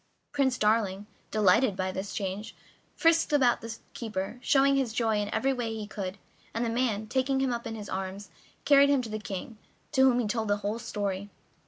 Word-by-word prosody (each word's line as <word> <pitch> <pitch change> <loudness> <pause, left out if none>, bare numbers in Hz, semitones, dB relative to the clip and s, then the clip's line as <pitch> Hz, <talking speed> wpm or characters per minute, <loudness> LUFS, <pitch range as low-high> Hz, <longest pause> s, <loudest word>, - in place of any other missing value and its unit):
Prince 265 -3 +1
Darling, 210 -2 +1 0.2
delighted 215 +1 +3
by 185 0 -1
the 190 +1 -3
change, 200 +1 -4 0.4
frisked 330 -1 +3
about 260 -5 +3
the 230 0 -6 0.2
keeper, 215 0 -4
showing 275 +1 +4
his 260 -5 0
joy 225 -2 +1
in 205 0 -2
every 270 +5 +1
way 235 -3 -3
he 215 -1 -5
could, 200 -2 -5 0.4
and 230 +1 0
the 230 - -1
man, 230 -3 0
taking 265 +4 0
him 265 -2 +1
up 235 0 -4
in 225 - -5
his 210 -2 -7
arms, 190 0 -5 0.3
carried 280 -1 +6
him 280 -3 +3
to 225 - -6
the 215 0 -3
King, 210 +2 -6 0.3
to 265 - +2
whom 245 - +2
he 245 - +1
told 220 +1 -1
the 205 0 +2
whole 215 +3 -1
story. 200 -3 -3
225 Hz, 200 wpm, -28 LUFS, 205-255 Hz, 0.4 s, carried